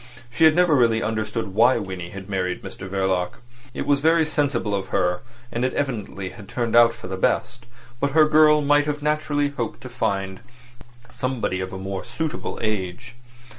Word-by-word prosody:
She 160 - +4
had 155 -1 +6
never 175 -2 +4
really 115 -3 +3
understood 110 -1 -3
why 120 +5 +5
Winnie 95 -3 -5
had 95 0 -9
married 90 -2 -2
Mr 95 - -8
Verloc. 95 -2 0 0.4
It - - -4
was 145 -1 +3
very 160 +2 +3
sensible 145 -8 -1
of 95 -1 -2
her, 90 +2 0 0.3
and 120 - -2
evidently 115 -8 -2
had 100 +1 -12
turned 120 -2 -1
out 115 0 +6
for - - -11
the 95 +1 -4
best, 120 +5 -1 0.3
but 140 +1 0
her 155 -1 +6
girl 150 0 +5
might 145 +1 +3
have 150 0 -3
naturally 150 -1 +1
hoped 120 -6 -4
to 130 - -8
find 100 -6 -2 0.7
somebody 125 -8 -2
of 95 0 -4
a 95 - -6
more 95 0 -5
suitable 160 -1 -4
age. 110 +2 -3
115 Hz, 175 wpm, -23 LUFS, 95-145 Hz, 0.7 s, had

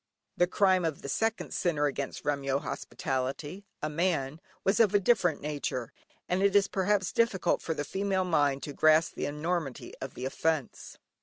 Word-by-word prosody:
The 175 - +3
crime 185 -1 +3
of 160 -3 -2
the - - -5
second 225 +8 -1
sinner 155 -5 +1
against 140 -1 -3
Remyo 140 -2 0
hospitality 145 +7 -4 0.2
(a 150 - 0
man) 160 -3 -1 0.2
was 195 +4 +2
of 210 -3 +4
a - - +6
different 190 -6 +2
nature, 140 -5 -3 0.3
and 180 +1 0
it 200 0 +3
is 200 -1 +5
perhaps 195 0 +1
difficult 230 -8 +1
for 160 - -2
the 145 - -2
female 190 +2 0
mind 145 -5 +1
to 145 - -5
grasp 155 +2 +4
the - - -3
enormity 150 -2 -3
of 135 -1 -6
the 125 - -5
offence. 155 +1 -2
165 Hz, 170 wpm, -29 LUFS, 145-190 Hz, 0.3 s, a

